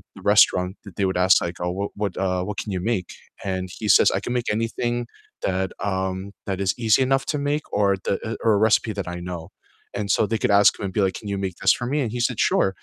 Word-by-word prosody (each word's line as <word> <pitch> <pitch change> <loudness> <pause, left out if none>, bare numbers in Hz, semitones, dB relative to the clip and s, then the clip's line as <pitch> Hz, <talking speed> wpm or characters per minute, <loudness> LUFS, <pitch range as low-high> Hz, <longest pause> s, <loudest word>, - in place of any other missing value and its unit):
the - - -12
restaurant, 90 0 +5
th 100 - -10
they 100 - +1
would 95 - -2
ask 95 - +6
like, 85 0 -5
"Oh, 90 - -1
what 100 - -2
what, 100 -3 0
uh, 90 0 0
what 105 -1 -5
can 105 - -6
you 90 - -2
make?" 90 -4 -3 0.4
And 95 0 -2
he 110 - -3
says, - - +5
"I - - +1
can 120 - -3
make 120 - -2
anything 120 +1 -1 0.5
that, 95 0 0 0.2
um 95 0 -1 0.3
that 95 -1 -2
is 95 - +3
easy 110 +4 +5
enough 135 0 +1
to 150 - -2
make 150 0 -1
or 105 -1 +3 0.2
the, 100 - +1
uh 110 - -3
or 110 - +5
a 100 - +2
recipe 110 0 +2
that 90 - -3
I - - -6
know." 85 -2 -5 0.6
And, 105 - -2
so, - - +1
they 110 +2 -1
could - - +2
ask 100 - +7
him 100 - -3
and 95 - -5
be 105 - +4
like, 95 - -2
"Can 105 - -8
you 100 - -1
make 90 -2 -5
this 95 - +5
for 120 - -4
me?" 150 - +1
And 115 - -3
he 120 - -1
said, 125 -4 -2
"Sure." - - +2
100 Hz, 270 wpm, -23 LUFS, 95-110 Hz, 0.6 s, ask